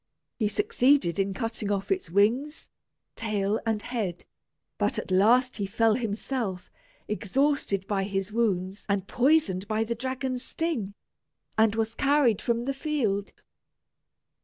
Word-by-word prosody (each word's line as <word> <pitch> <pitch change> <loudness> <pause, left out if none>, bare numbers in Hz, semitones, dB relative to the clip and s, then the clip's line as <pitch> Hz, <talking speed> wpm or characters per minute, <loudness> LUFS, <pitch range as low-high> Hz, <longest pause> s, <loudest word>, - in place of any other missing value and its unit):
He 215 - +2
succeeded 280 - +2
in 195 0 +1
cutting 225 -2 -3
off 200 - -2
its 375 -1 0
wings, 235 - +1 0.5
tail, 210 -1 -1
and 220 -1 +1
head; 200 -8 -3 0.5
but - - +1
at - - -4
last 240 +7 +4
he 200 -2 -2
fell 225 +2 +3
himself, 215 -3 -3 0.4
exhausted 210 -1 0
by 195 -1 -1
his 195 0 -2
wounds 200 -4 -1
and 200 -1 0
poisoned 245 - +2
by 220 +1 +1
the 230 +1 -2
dragon's 260 +1 -3
sting, 250 - -2 0.6
and 220 -1 +3
was 225 0 0
carried 275 -6 +3
from 235 0 0
the 275 - -1
field. 265 -9 -1
225 Hz, 135 wpm, -27 LUFS, 200-260 Hz, 0.6 s, last